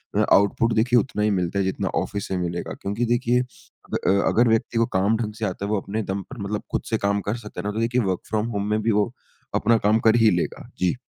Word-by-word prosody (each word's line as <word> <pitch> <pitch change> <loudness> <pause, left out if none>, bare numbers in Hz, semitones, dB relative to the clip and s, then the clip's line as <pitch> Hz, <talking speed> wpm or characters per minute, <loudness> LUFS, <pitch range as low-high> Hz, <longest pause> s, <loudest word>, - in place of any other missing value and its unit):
अ, - - +3
output 105 +3 +3
देखिए 120 +2 +4
उतना 110 -4 -2
ही 105 - +3
मिलता 90 +2 -1
है 95 - +1
जितना 95 - -1
ऑफ़िस 100 -1 -4
से 95 - -2
मिलेगा। 85 -1 -3
क्योंकि 105 +5 -1
देखिए 120 0 +2
अ, 125 -7 -6 0.2
अगर 120 +2 +4
व्यक्ति 115 +1 +1
को 115 - +4
काम 100 +4 +2
ढंग 110 -2 -3
से 110 - -1
आता 100 0 -3
है - - -4
वो 105 - +2
अपने 110 +2 -3
दम 100 +1 -2
पर 130 - -9
मतलब 105 +1 -3
खुद - - 0
से 110 - +1
काम 100 0 +1
कर 115 - -1
सकता 105 -2 -9
है - - -11
ना, - - -1
तो 110 - -3
देखिए 120 +2 +1
वर्क 95 -4 -1
फ्रॉम 110 +1 0
होम 100 +1 -2
में 110 0 +1
भी 115 - +1
वो 105 +3 +1 0.4
अपना 115 0 +3
काम 110 +1 +4
कर 110 - +6
ही - - +7
लेगा। - - -5
जी। 90 +4 +1
105 Hz, 260 wpm, -23 LUFS, 100-115 Hz, 0.4 s, ही